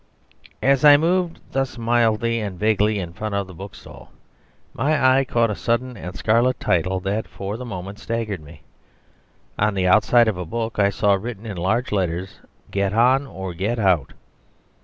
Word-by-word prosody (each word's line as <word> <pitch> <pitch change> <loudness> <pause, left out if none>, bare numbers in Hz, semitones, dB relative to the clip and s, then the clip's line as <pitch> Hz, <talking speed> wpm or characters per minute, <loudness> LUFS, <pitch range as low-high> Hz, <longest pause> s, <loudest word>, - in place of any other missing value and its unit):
As 135 +1 +3
I 145 -1 +9
moved 170 +2 0
thus 135 -1 -2
mildly 115 -1 +1
and 100 -4 -5
vaguely 105 +1 +2
in 85 -3 -5
front 105 +3 -4
of 100 -1 -1
the 95 - -12
bookstall, 95 +3 -12 0.6
my 135 -1 +3
eye - - +2
caught 115 -3 +1
a - - -3
sudden 120 +3 -1
and 90 -2 -8
scarlet 120 +5 +2
title 90 +2 0
that 100 +3 -2
for 100 +1 -6
the 125 +2 -7
moment 100 -2 -7
staggered 115 -6 -3
me. 75 0 -14 1.0
On 105 0 +1
the 95 -1 0
outside 115 +5 +5
of 105 -5 0
a - - -2
book 115 +5 -4
I 100 -1 +4
saw 100 0 +2
written 110 +2 -4
in 105 -3 -5
large 110 +8 -1
letters, 95 -1 -2 0.3
"Get 100 0 0
On 130 +5 +3
or 95 -6 -6
Get 100 +8 -2
Out." 95 -9 +1
105 Hz, 175 wpm, -22 LUFS, 95-120 Hz, 1.0 s, I